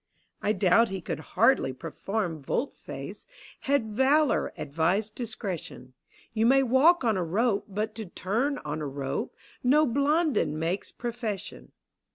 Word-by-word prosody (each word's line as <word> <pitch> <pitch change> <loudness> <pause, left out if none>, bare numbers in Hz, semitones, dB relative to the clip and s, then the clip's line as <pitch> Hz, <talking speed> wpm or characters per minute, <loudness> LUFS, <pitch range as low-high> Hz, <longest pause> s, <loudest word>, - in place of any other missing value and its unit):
I 210 - +1
doubt 195 +4 +4
he 190 0 -3
could 175 - -4 0.2
hardly 230 - +4
perform 165 - -3
volte 250 - -2
face - - -8 0.4
Had 250 -6 +2
valour 270 +6 +3
advised 180 +9 0
discretion: 200 - -6 0.4
You 225 0 +2
may 270 +2 +5
walk 270 +7 +5
on 225 -4 +2
a 180 - 0
rope, 200 +5 +1
but 215 +2 -2
to 220 -3 -5
turn 235 +12 -1
on 150 +1 -3
a 150 - -2
rope 135 0 -4 0.3
N<> 270 0 +4
Blondin 280 - +2
makes 165 +5 -2
profession. 235 -4 -5
215 Hz, 140 wpm, -28 LUFS, 175-260 Hz, 0.4 s, may